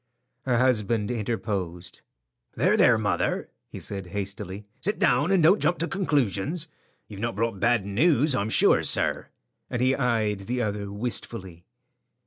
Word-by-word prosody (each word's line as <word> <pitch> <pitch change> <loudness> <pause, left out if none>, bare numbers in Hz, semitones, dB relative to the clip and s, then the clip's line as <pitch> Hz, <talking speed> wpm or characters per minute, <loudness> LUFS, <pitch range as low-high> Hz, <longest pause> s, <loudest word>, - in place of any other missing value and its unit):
Her 125 -2 +2
husband 115 -3 +1
interposed. 100 -6 -4 0.5
"There, - - +3
there, - - +5
mother," - - -1 0.2
he - - -9
said, 95 -2 -6
hastily. 100 +1 -5
"Sit 205 +4 -1
down, 145 +7 +2
and 190 -4 +3
don't 180 +7 +5
jump 175 - +2
to 165 - -1
conclusions. 150 - 0 0.4
You've 100 -2 -10
not 115 0 -2
brought 110 -2 -1
bad 120 -3 +2
news, 140 - +3
I'm 105 -3 -1
sure, - - +5
sir;" - - +1 0.4
and 125 - -3
he 130 +2 +3
eyed 110 -7 0
the 125 +1 -1
other 105 -3 -3
wistfully. 100 -5 -5
115 Hz, 145 wpm, -26 LUFS, 100-130 Hz, 0.5 s, there